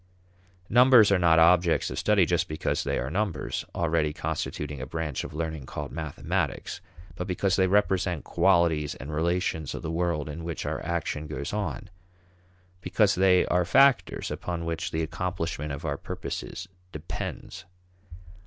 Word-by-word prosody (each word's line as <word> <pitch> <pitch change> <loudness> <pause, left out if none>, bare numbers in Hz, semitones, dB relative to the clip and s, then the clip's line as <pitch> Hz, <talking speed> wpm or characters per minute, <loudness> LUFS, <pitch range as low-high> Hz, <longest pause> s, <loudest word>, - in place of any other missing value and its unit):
Numbers 125 -3 +6
are 100 - +4
not 85 -2 +4
objects 85 +1 +4
of - - -3
study 105 -4 +3
just 85 +1 0
because 75 - -2
they - - -1
are 65 - -3
numbers 100 -2 -2
already 80 -2 +1
constituting 75 -2 -4
a 65 - -5
branch 80 -2 -3
of - - -8
learning 80 -4 -4
called 75 -2 -6
mathematics, 80 -2 -3 0.3
but 90 - -5
because 95 +1 +1
they 95 -1 +3
represent 95 -4 +1
qualities 85 -5 +2
and 70 +3 -8
relations 80 -1 -1
of - - -7
the 80 - -3
world 85 -3 -1
in 75 +2 -6
which 85 -2 -4
our - - -3
action 80 -2 -3
goes 70 +1 -5
on, 105 0 -3 0.9
because 105 +2 +2
they 90 -1 +4
are 90 0 +2
factors 135 +8 +3
upon 85 -2 -4
which 85 +2 -2
the 80 0 -1
accomplishment 80 -3 -3
of 70 +3 -6
our 70 -2 -1
purposes 90 - -6 0.2
depends. 80 0 -6
85 Hz, 155 wpm, -27 LUFS, 75-90 Hz, 0.9 s, Numbers